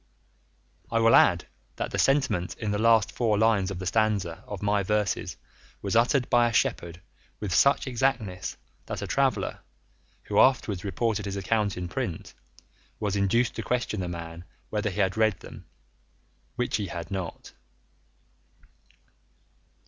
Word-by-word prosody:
I 115 - 0
will 115 0 +5
add - - +5 0.3
that - - -4
the - - -2
sentiment 130 -11 +1
in 105 -2 -2
the 105 - -1
last 115 -1 +4
four 110 -4 +1
lines 105 -3 +3
of 95 - -5
the 95 - -6
last 90 - 0
stanza 105 -7 0
of 105 -1 -6
my 105 0 +2
verses 105 0 -1 0.5
was 100 +2 -1
uttered 125 +3 +3
by 120 -1 +4
a - - -6
shepherd 85 -4 0 0.4
with 100 -5 -3
such 140 +10 +4
exactness, 120 -7 -1 0.3
that - - -4
a - - -2
traveller, - - 0 0.6
who - - 0
afterwards 110 -8 +3
reported 105 +2 -1
his 100 0 -4
account 100 0 0
in 90 -1 -4
print, 95 -4 -4 0.7
was 105 -2 -1
induced 105 +5 +2
to - - -1
question 120 -3 -1
the 90 - -3
man 85 0 -7 0.3
whether 110 0 0
he 100 +2 -2
had 95 +2 0
read 110 -5 +2
them, - - -11 0.9
which 125 0 0
he 105 -2 -3
had 85 0 -7
not. 95 -4 -5
105 Hz, 155 wpm, -27 LUFS, 95-115 Hz, 0.9 s, will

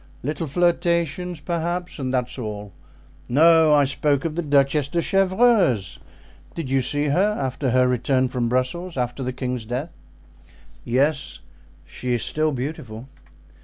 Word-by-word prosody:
Little 150 +4 -3
flirtations, 170 +1 0
perhaps, 175 +2 -3
and 130 -2 -2
that's 125 0 -2
all. 105 -3 -6 0.6
No, 160 +3 +5
I 145 - +5
spoke 140 +1 0
of 165 - -1
the 175 - -1
Duchess 140 -1 +2
de 170 +4 -1
Chevreuse; 190 - +2 0.6
did 155 -6 -5
you 135 0 +3
see 145 +3 -1
her 200 +8 +2
after 130 0 -2
her 125 +1 +3
return 130 +1 +1
from 125 -2 -2
Brussels, 135 +8 -2
after 125 +1 -2
the 130 0 -2
king's 125 -2 -4
death?" 130 +8 -4 0.9
"Yes, 140 +5 0 0.5
she 125 +7 -3
is 120 - -1
still 155 0 0
beautiful." 125 -3 -6
140 Hz, 140 wpm, -23 LUFS, 125-165 Hz, 0.9 s, No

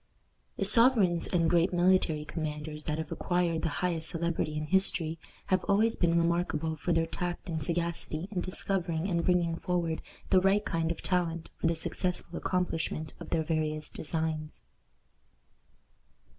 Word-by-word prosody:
The - - 0
sovereigns 225 -9 +5
and 170 -2 +1
great 170 +2 +3
military 175 -4 +2
commanders 150 -1 -5
that 150 -1 -2
have 160 -1 -5
acquired 175 -3 0
the 165 - 0 0.2
highest 165 -3 +1
celebrity 165 -2 -2
in 155 - -3
history 165 -2 +1 0.3
have 185 - +2
always 220 +3 +2
been 170 -1 +2
remarkable 170 -2 0
for 165 +3 -3
their 165 -1 +2
tact 175 +1 -4
and 160 -2 -2
sagacity 170 0 0
in 185 -4 -2
discovering 180 -2 -1
and 170 -3 0
bringing 170 -2 +1
forward 170 -3 -2 0.3
the 185 -2 +5
right 195 +2 +2
kind 165 -1 -1
of 170 - -4
talent 170 -2 -1
for - - 0
the 165 - +1
successful 175 +1 0
accomplishment 165 -4 -2
of - - -9
their 165 -2 0
various 155 -1 -1
designs. 155 0 -3
170 Hz, 150 wpm, -29 LUFS, 160-180 Hz, 0.3 s, sovereigns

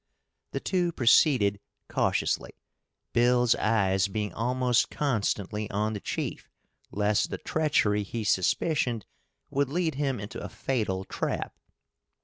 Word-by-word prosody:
The - - -3
two 180 -2 0
proceeded 115 -5 +4 0.3
cautiously, - - 0 0.6
Bill's 120 0 +4
eyes 100 -3 +2
being 105 0 -3
almost 125 +1 +1
constantly 105 -5 -1
on 105 +2 -1
the 105 - -4
chief, - - -4 0.4
lest 105 0 +1
the - - -4
treachery 140 -10 +1
he 110 +3 -4
suspicioned 115 - +1 0.5
would 140 -1 +1
lead 165 +1 0
him 135 -3 -1
into 105 +1 -7
a - - -5
fatal 105 -8 -2
trap. - - -3
115 Hz, 120 wpm, -28 LUFS, 105-135 Hz, 0.6 s, proceeded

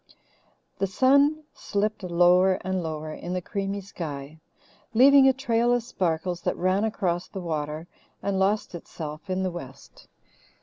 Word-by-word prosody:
The 195 - +1
sun 280 +8 +3
slipped 210 +1 -2
lower 180 +1 +4
and 185 0 -1
lower 155 -1 -5
in 175 +3 -6
the 185 - 0
creamy 200 +1 -3
sky, 155 -5 -7 0.6
leaving 270 +3 +7
a - - +7
trail 240 -2 +1
of 245 -1 +2
sparkles 175 -4 -2
that - - -1
ran 185 +3 +1
across 185 -6 -1
the 195 - -7
water 155 -2 -3 0.4
and 195 -1 0
lost 200 +2 +1
itself 160 0 -8
in 185 0 -1
the 185 - -1
west. 140 -5 -11
185 Hz, 145 wpm, -26 LUFS, 170-215 Hz, 0.6 s, leaving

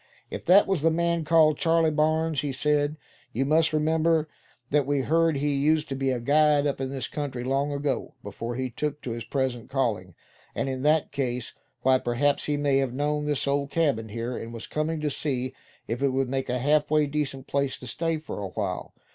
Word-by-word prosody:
"If - - -6
that 190 +4 +7
was 190 -6 0
the 165 - +4
man 170 0 0
called 155 -1 +4
Charley 165 -1 +3
Barnes," 155 0 +1
he 145 -1 -2
said, 150 +2 +1 0.4
"you 135 +4 0
must 160 +3 +3
remember 160 +1 +2 0.4
that 145 -2 +2
we 145 -1 +1
heard 165 +3 +2
he 145 +1 0
used 150 +3 +2
to 135 - -2
be 135 0 0
a 130 -2 0
guide 150 +3 +3
up 140 -2 -1
in 135 - -2
this 135 -2 -3
country 135 -5 -4
long 135 +3 0
ago, 140 -1 -2
before 115 +4 -5
he 130 0 -3
took 150 +4 -3
to 125 - -4
his 115 0 -4
present 130 -2 -2
calling. 110 -10 -1 0.4
And - - -1
in 130 -1 -3
that 150 +2 +2
case, 125 -4 -3 0.3
why, 130 0 +4
perhaps 130 +4 +1
he 145 -1 0
may 145 -2 +2
have 135 -2 0
known 150 +1 0
of - - -4
this 145 -2 0
old 140 0 0
cabin 140 -8 0
here, 115 +3 -4
and 115 0 -6
was 115 -1 -7
coming 155 +1 -2
to 150 -1 -1
see 130 -3 -2 0.3
if 120 +3 -3
it 140 - +3
would 135 -1 0
make 135 0 -2
a 125 - 0
half 145 +4 +2
way 155 0 +3
decent 140 -2 -3
place 140 -1 -1
to - - -11
stay 165 +5 -1
for 155 -8 -7
a 100 - -3
while. 95 -2 -4
140 Hz, 215 wpm, -26 LUFS, 130-155 Hz, 0.4 s, that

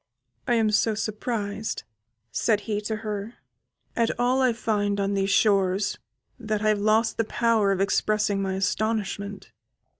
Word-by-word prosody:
"I 240 - +3
am 220 -2 +2
so 215 +1 +2
surprised," 215 0 -3 0.5
said 215 -3 +1
he 210 0 -2
to 220 +1 -2
her, 210 +2 -4 0.6
"at 230 -1 +2
all 250 +2 +2
I 255 -1 +4
find 205 -3 -1
on 200 0 0
these 195 0 0
shores, 200 -1 +2 0.4
that 215 -2 -2
I 215 - +3
have 210 -1 +2
lost 220 +2 +2
the 225 - +2
power 225 -2 +2
of 195 - 0
expressing 205 +1 +1
my 190 -1 -1
astonishment. 200 0 -2
210 Hz, 150 wpm, -25 LUFS, 200-225 Hz, 0.6 s, I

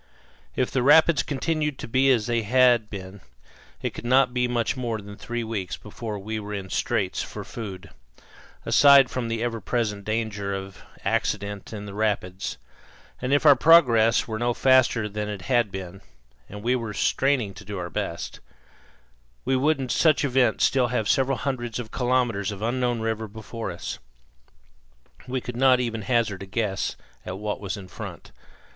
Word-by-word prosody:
If 125 - 0
the 130 - +1
rapids 155 +4 +6
continued 150 0 -2
to - - -7
be 130 +3 +3
as 120 -5 +3
they 120 0 0
had 120 -1 +4
been 95 -1 -8 0.6
it - - -2
could - - -8
not 125 +1 +3
be 125 0 +1
much 120 +1 0
more 120 -3 -2
than 100 0 -10
three 120 +3 -4
weeks 105 -5 -4
before 105 0 -6
we 110 +2 -4
were 105 0 -5
in 95 -2 -6
straits - - -1
for - - -6
food, 95 -4 -8 0.7
aside 140 -3 +6
from 125 -2 -2
the 115 0 -2
ever 115 -2 -2
present 105 -1 -2
danger 105 -2 -2
of 95 0 -8 0.2
accident 100 -1 -2
in 105 -2 -6
the 100 - -8
rapids; 100 -3 -2 0.6
and 125 +1 -2
if 145 +2 +3
our 145 -2 +9
progress 120 -7 +5
were 110 -1 -4
no 120 0 0
faster 130 -4 +3
than 105 0 -4
it 100 -3 -6
had 120 -3 +2
been 95 0 -7 0.5
and 105 +1 -9
we 125 +2 +2
were 115 -4 -4
straining 130 -7 +1
to - - -12
do 100 0 -6
our 85 -2 -5
best - - -4 1.1
we 135 - +2
would 145 +3 +2
in 130 - -3
such 155 +3 +3
event 125 -4 +2
still 130 -2 +3
have 115 -3 -1
several 135 0 +2
hundreds 120 -3 -3
of 120 -3 -6
kilometres 120 -6 0
of 100 +1 -7
unknown 120 0 0
river 110 0 -2
before 110 +1 -7
us. 85 - -6 1.3
We 130 0 -2
could 125 0 -7
not 130 -1 +5
even 115 -3 -2
hazard 110 -4 0
a 100 - -7
guess 100 -1 -2 0.3
at 90 +1 -6
what 105 +1 -3
was 100 -1 -4
in 95 -2 -9
front. - - -9
115 Hz, 175 wpm, -25 LUFS, 105-125 Hz, 1.3 s, our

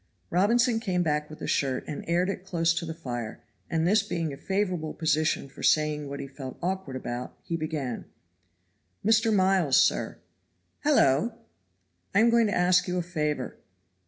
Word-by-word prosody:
Robinson 230 +6 +3
came 180 -5 0
back 150 -2 0
with 155 - -9
the - - -6
shirt, 135 -2 0
and 150 - -5
aired 175 +2 +2
it 195 -2 -3
close 170 -3 +1
to 170 0 -3
the 160 - -3
fire; 120 -8 -5 0.3
and 165 0 +1
this 210 +5 +4
being 165 -4 -3
a - - -5
favorable 180 -2 -2
position 155 -2 +1
for 135 - -13
saying 150 -1 +2
what 140 - -5
he - - -4
felt 135 -1 -8
awkward 185 -6 -3
about, 125 -1 -5
he 170 - -3
began: 155 -6 -3 1.0
"Mr. 225 +1 +4
Miles, 185 -7 +3
sir." - - +2 0.6
"Hallo!" 230 - +3 0.8
"I - - +6
am 230 +1 +5
going 230 -1 +4
to - - -1
ask 180 +1 +3
you 180 0 -1
a 175 - 0
favor." 150 -6 -2
165 Hz, 170 wpm, -27 LUFS, 150-190 Hz, 1.0 s, I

